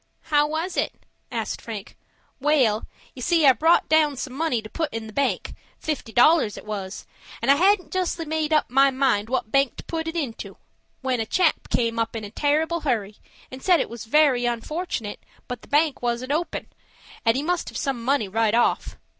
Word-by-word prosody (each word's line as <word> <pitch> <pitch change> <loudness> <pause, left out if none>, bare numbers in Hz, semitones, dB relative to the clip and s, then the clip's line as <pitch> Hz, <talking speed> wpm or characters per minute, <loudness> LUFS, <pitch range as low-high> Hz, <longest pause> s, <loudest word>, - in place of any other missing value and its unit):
"How 295 0 +5
was 320 +4 -3
it?" - - 0 0.4
asked - - -3
Frank. 215 -4 -7 0.4
"Wal, 260 -7 +2 0.3
you 255 - -10
see 330 +3 +3
I 265 - +8
brought 325 +5 +3
down 305 -3 +3
some 255 0 -5
money 280 -4 0
to 215 - -9
put 315 +6 -3
in 225 -1 -5
the 215 - -10
bank, 280 +3 -1 0.2
fifty 300 -7 -4
dollars 250 -2 +4
it - - -10
was, 200 -2 -5 0.3
and 250 +4 +3
I - - +6
hadn't 380 +2 +3
justly 360 -2 -1
made 315 0 -1
up 310 - +3
my 275 +2 +5
mind 260 -6 +1
what 255 -4 -2
bank 275 -2 +2
to - - -8
put 325 -1 -4
it 325 - -4
into, 275 -9 -4 0.4
when 260 -2 0
a 225 - -1
chap 355 +3 +1
came 230 -1 0
up 230 0 -1
in 220 - -4
a 205 - -7
terrible 310 +6 +1
hurry, 220 -9 -2 0.3
and 260 +1 -9
said 355 +1 +4
it - - -2
was 235 -1 -7
very 255 -1 +3
unfortunate, 240 - -3 0.3
but 245 -2 -5
the - - -16
bank 295 0 +2
wasn't 245 +2 -2
open, 325 +4 -2 0.6
and 225 +1 +3
he 275 - -1
must 355 +2 -1
have - - -7
some 265 -4 -2
money 265 -4 +1
right 220 +2 +1
off. 240 - +1
270 Hz, 200 wpm, -24 LUFS, 230-315 Hz, 0.6 s, I